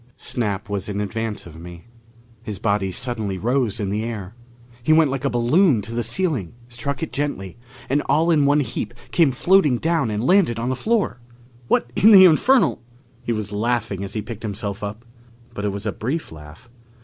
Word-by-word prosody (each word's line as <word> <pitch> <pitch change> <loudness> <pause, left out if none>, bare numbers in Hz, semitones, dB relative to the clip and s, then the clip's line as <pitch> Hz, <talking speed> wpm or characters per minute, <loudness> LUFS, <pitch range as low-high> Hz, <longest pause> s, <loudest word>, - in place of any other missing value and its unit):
Snap 105 -3 -3
was 100 0 -3
in 100 0 -3
advance 105 +1 -3
of 80 -1 -12
me. 85 +1 -11 0.6
His 105 -3 -6
body 100 -2 0
suddenly 110 -2 -2
rose 120 +2 0
in 100 -2 -2
the 105 +2 -1
air. 105 -4 -6 0.5
He 135 - +1
went 155 -3 +5
like 135 -1 -3
a 140 - +1
balloon 120 - +3
to 115 - -7
the 120 - -1
ceiling, 120 - -1
struck 130 +4 -4
it 160 - -4
gently, 120 -9 -4 0.3
and 140 +3 +1
all 165 +3 +3
in 145 -3 +3
a 145 0 +3
heap 120 0 -5 0.2
came 165 -4 +4
floating 150 -1 +3
down 165 -4 0
and 105 +2 -2
landed 180 - +3
on 120 +2 -2
the 130 - 0
floor! 210 - 0 0.5
"What 120 0 +1
in 215 - +6
the 195 -3 +9
infernal 215 - +4 0.2
" 120 -3 -33
He - - +1
was 110 -3 -3
laughing 110 -2 -1
as 100 - -6
he 110 - -3
picked 115 -2 -8
himself 100 -2 -4
up. 105 +3 -6 0.5
But 105 -2 -4
it 100 - 0
was 100 +2 -6
a 105 - 0
brief 135 - -4
laugh. 75 +9 -13
115 Hz, 195 wpm, -22 LUFS, 105-140 Hz, 0.6 s, the